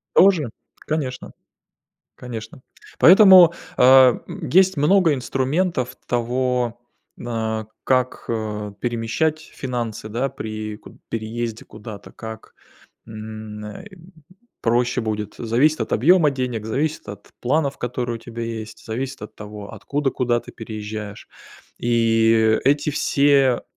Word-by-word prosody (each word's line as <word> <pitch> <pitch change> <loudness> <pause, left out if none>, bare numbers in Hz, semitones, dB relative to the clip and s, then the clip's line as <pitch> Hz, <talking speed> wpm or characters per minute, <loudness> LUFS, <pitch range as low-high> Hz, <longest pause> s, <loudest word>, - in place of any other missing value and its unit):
Тоже. 175 - +5 0.3
Конечно. 140 -5 -4 0.9
Конечно. 115 0 -8 0.4
Поэтому, 185 -2 +8 0.2
а, 130 -1 +7
м, 165 -8 -7
есть 190 +4 +4
много 165 +2 +4
инструментов 130 +1 -1
того, 125 0 -1 0.4
а, 110 -2 -2 0.2
как, 130 -1 0
а, 105 -2 -3
перемещать 120 +7 -1
финансы, 120 -8 -5
да, 120 +5 -1
при 110 -4 -6
куд - - -15
переезде 115 0 -4
куда-то, 110 -1 -10
как, 110 -1 -10 0.5
м, 110 -1 -8
э, 105 - -9 0.7
проще 120 +2 +1
будет. 105 -2 -3
Зависит 125 +6 +2
от 110 - -3
объема 160 +4 +5
денег, 125 -5 -3
зависит 145 +6 -2
от 100 0 -10
планов, 140 +2 0
которые 120 -1 -3
у - - -10
тебя 115 0 -8
есть, 110 -1 -6
зависит 130 +1 -5
от 105 - -9
того, 105 -1 -9
откуда 135 +6 -2
куда 120 -2 0
ты - - -12
переезжаешь. 105 -2 -7 0.5
И 115 -1 +3
эти 145 +2 +2
все, 140 -3 +3
120 Hz, 115 wpm, -22 LUFS, 110-135 Hz, 0.9 s, Поэтому